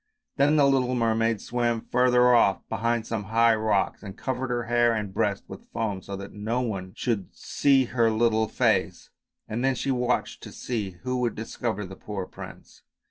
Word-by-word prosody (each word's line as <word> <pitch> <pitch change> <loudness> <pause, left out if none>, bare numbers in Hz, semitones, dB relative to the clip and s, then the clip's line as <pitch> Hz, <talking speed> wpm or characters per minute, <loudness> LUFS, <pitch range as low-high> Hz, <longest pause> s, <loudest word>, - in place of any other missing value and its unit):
Then 145 +2 +4
the 145 -2 +5
little 130 -2 +2
mermaid 115 -2 +1
swam 120 -1 -1
further 125 +1 +3
off 100 -6 +3
behind 115 +1 -1
some 110 -3 -3
high 115 +3 +4
rocks 110 -3 0
and 100 -1 -9
covered 130 0 -3
her 120 -1 -1
hair 120 0 +2
and 105 -3 -4
breast 100 0 0
with - - -11
foam, 105 -4 -2
so 100 - -7
that 100 0 -8
no 110 +4 -2
one 95 -6 -4
should 110 -6 -2
see 135 -2 +2
her 115 -1 +2
little 110 0 +2
face, - - 0 0.4
and 115 +3 -3
then 135 0 +2
she 135 - -1
watched 125 -1 -1
to - - -9
see 105 -7 -4
who 125 0 -1
would 120 -3 -1
discover 110 -1 -4
the 95 +1 -9
poor 100 -1 -5
prince. - - -12
115 Hz, 185 wpm, -26 LUFS, 105-125 Hz, 0.4 s, the